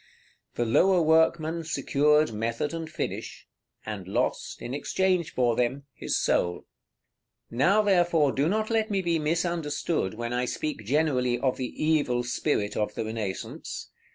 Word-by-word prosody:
The 120 - 0
lower 180 +11 +4
workman 160 0 +2
secured 150 -2 +2
method 115 +7 -2
and 165 -1 -5
finish, - - -5 0.4
and 105 -4 -6
lost, 95 - -2
in 120 - -6
exchange 180 +3 0
for 120 -2 +1
them, 125 +4 0
his - - -2
soul. 85 - +2
§ - - -8
XXI. - - -13 0.9
Now, 180 - +3
therefore, 175 -7 +3
do 140 +5 +1
not 215 +3 0
let 220 -1 +1
me 195 -2 0
be 170 -2 +1
misunderstood 160 - -1
when 120 +1 -4
I 125 +1 0
speak 150 -2 -3
generally 125 -2 +1
of 130 +1 0
the 130 - -2
evil 145 -5 0
spirit 120 -3 -1
of 105 0 -1
the - - -2
Renaissance. 110 -4 -5
150 Hz, 155 wpm, -27 LUFS, 120-165 Hz, 0.9 s, lower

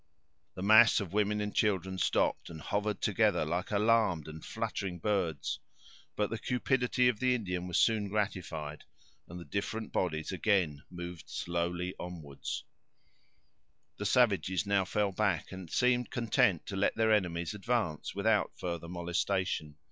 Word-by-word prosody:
The 90 - -5
mass 110 +2 +7
of 95 -3 -5
women 105 0 +1
and 105 0 -3
children 95 -2 0
stopped, - - +1
and 80 - -8
hovered 105 +4 -2
together - - +2
like 85 +4 -2
alarmed 105 -6 +2
and 80 0 -9
fluttering 95 -3 -3
birds. 90 -6 -1 0.6
But 105 -1 0
the 115 - -3
cupidity 125 0 +1
of 120 -4 +1
the 130 -1 +3
Indian 90 -6 -3
was 90 - 0
soon 110 -3 +3
gratified, 90 -7 -3 0.4
and 90 +1 -8
the 85 - -9
different 110 +2 -3
bodies 80 -4 -1
again 90 -7 +1
moved 90 -2 -8
slowly 85 +1 -2
onward. 80 -6 -8 1.5
The 105 - -2
savages 100 -6 +2
now 100 -1 +2
fell 105 +1 0
back, 95 -4 0
and 95 -3 -8
seemed 125 +2 +2
content 105 -7 +2
to 100 - -5
let 95 - +1
their 110 -1 +3
enemies 90 -2 0
advance 105 -8 -2
without 105 +1 +1
further 85 -2 -4
molestation. 85 -2 -1
95 Hz, 145 wpm, -31 LUFS, 85-105 Hz, 1.5 s, mass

